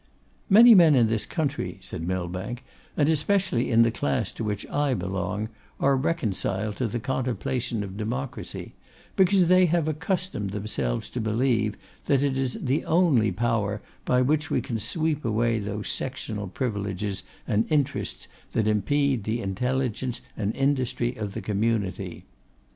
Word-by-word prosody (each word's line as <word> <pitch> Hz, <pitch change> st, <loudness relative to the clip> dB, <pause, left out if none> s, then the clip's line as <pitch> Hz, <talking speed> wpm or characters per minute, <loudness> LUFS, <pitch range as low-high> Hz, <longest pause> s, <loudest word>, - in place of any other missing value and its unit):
'Many 230 Hz, +4 st, +9 dB
men 170 Hz, -7 st, +7 dB
in 120 Hz, -3 st, +5 dB
this 110 Hz, -1 st, 0 dB
country,' 140 Hz, -, -2 dB
said 90 Hz, -, -6 dB
Millbank, 95 Hz, +6 st, -3 dB, 0.3 s
'and 145 Hz, -, +3 dB
especially 160 Hz, -3 st, +2 dB
in 115 Hz, -1 st, +6 dB
the 115 Hz, -, +2 dB
class 120 Hz, -4 st, -1 dB
to -, -, -6 dB
which 105 Hz, -1 st, -2 dB
I 145 Hz, -3 st, +1 dB
belong, 95 Hz, +2 st, -3 dB, 0.3 s
are 140 Hz, 0 st, +3 dB
reconciled 110 Hz, -, -1 dB
to 125 Hz, -, 0 dB
the 120 Hz, +3 st, -3 dB
contemplation 125 Hz, -2 st, -2 dB
of 95 Hz, 0 st, -7 dB
democracy; 120 Hz, +5 st, -5 dB, 0.4 s
because 190 Hz, -1 st, +4 dB
they 185 Hz, 0 st, +6 dB
have 165 Hz, -1 st, +1 dB
accustomed 155 Hz, -, -2 dB
themselves 100 Hz, -, -2 dB
to 125 Hz, -, -3 dB
believe, 110 Hz, -1 st, +1 dB, 0.3 s
that 140 Hz, -1 st, +3 dB
it 140 Hz, -2 st, +1 dB
is 130 Hz, -1 st, -1 dB
the 135 Hz, +4 st, 0 dB
only 155 Hz, -, +3 dB
power 105 Hz, 0 st, 0 dB, 0.2 s
by 125 Hz, 0 st, +3 dB
which 155 Hz, +3 st, +1 dB
we -, -, +1 dB
can 115 Hz, -4 st, -3 dB
sweep 155 Hz, +7 st, -1 dB
away 115 Hz, +1 st, +1 dB
those 105 Hz, 0 st, -4 dB
sectional 110 Hz, -6 st, -3 dB
privileges 100 Hz, -3 st, -3 dB, 0.3 s
and 110 Hz, +4 st, +1 dB
interests 145 Hz, -2 st, -1 dB, 0.3 s
that 110 Hz, -, +1 dB
impede 120 Hz, +4 st, +1 dB
the 110 Hz, +3 st, -1 dB
intelligence 125 Hz, +4 st, -2 dB
and 105 Hz, 0 st, -2 dB
industry 130 Hz, -3 st, 0 dB
of 105 Hz, -4 st, -5 dB
the -, -, -3 dB
community. 105 Hz, -2 st, -2 dB
120 Hz, 150 wpm, -26 LUFS, 105-140 Hz, 0.4 s, Many